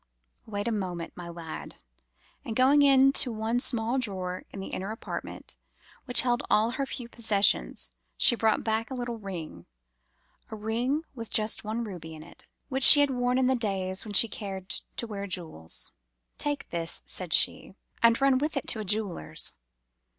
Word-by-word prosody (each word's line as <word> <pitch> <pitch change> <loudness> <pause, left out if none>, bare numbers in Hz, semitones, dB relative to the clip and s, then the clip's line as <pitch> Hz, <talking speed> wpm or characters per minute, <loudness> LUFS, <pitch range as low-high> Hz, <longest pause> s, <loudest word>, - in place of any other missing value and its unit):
"'Wait 205 -1 -4
a - - 0
moment, 180 -5 -4
my 175 -1 -8
lad,' 170 -2 -8 0.7
and 230 -5 -6
going 265 +4 +4 0.3
to 260 - +5
the 225 - -6
one 225 +2 -1
small 245 0 0
drawer 185 -6 -4
in 200 - -9
the 190 - -6
inner 190 +2 -5
apartment, 220 - -7 0.5
which 245 - +6
held 245 -1 0
all 220 +2 +3
her 275 +2 -3
few 245 -2 -4
possessions, 220 -4 0 0.3
she 240 - +6
brought 220 -2 +1
back 220 +2 -1
a 265 - -5
little 240 -2 -5
ring—a 65 - -12
ring 235 +8 -2 0.3
just 215 0 +2
with - - -14
one 220 +2 -3
ruby 170 -7 -8
in 155 - -11
it—which 265 - -7
she 290 +2 +12
had 285 -1 +2
worn 245 0 0
in 260 - +2
the 260 - +3
days 190 -5 -1
when 210 - -8
she 230 - +6
cared 195 -4 -7 0.3
to - - -2
wear 200 -3 -6
jewels. 160 - -5 0.5
'Take 290 -1 -2
this,' 165 -1 -3
said 180 -3 -4
she, 190 - +2 0.3
'and 230 0 +4
run 270 -1 +3
with 300 +1 -2
it 275 - -3
to 220 - +5
a - - -3
jeweller's. 205 - -2
220 Hz, 170 wpm, -27 LUFS, 185-245 Hz, 0.7 s, she